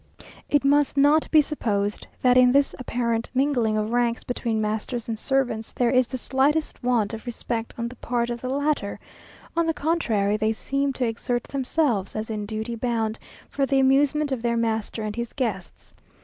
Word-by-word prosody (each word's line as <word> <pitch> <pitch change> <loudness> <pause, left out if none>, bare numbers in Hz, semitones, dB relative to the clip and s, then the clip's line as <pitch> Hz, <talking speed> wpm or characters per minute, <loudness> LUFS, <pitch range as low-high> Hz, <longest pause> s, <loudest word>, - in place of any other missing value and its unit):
It 290 -1 +2
must 285 0 +3
not 290 +3 +4
be 310 -2 +6
supposed 210 -9 -2 0.2
that 250 -1 +5
in 250 -1 +6
this 280 +1 +3
apparent 235 -2 -1
mingling 250 -5 +2
of 215 +2 -1
ranks 240 -1 +1
between 230 -3 -2
masters 215 +3 -2
and 230 - -1
servants, 255 -5 -1
there 245 -2 +1
is 255 -1 +3
the 255 - -4
slightest 275 +5 0
want 235 -4 +1
of 225 +2 -7
respect 230 -1 -4
on 235 0 -2
the 245 - -9
part 240 0 -1
of 240 -1 -5
the 255 - -4
latter; 285 -6 -1 0.6
on 335 0 +2
the 325 - 0
contrary, 225 -11 +1
they 215 +1 +1
seem 275 +5 -1
to 255 - -1
exert 240 +1 -2
themselves, 265 -7 -1
as 220 +1 -3
in 210 -1 -4
duty 220 +2 -4
bound, 225 -2 -1 0.3
for 275 -1 -1
the 275 -1 +2
amusement 280 +2 +3
of 260 -3 -1
their 235 0 0
master 225 -1 -1
and 210 -1 -4
his 235 0 -4
guests. 215 -9 -4
240 Hz, 185 wpm, -24 LUFS, 220-275 Hz, 0.6 s, be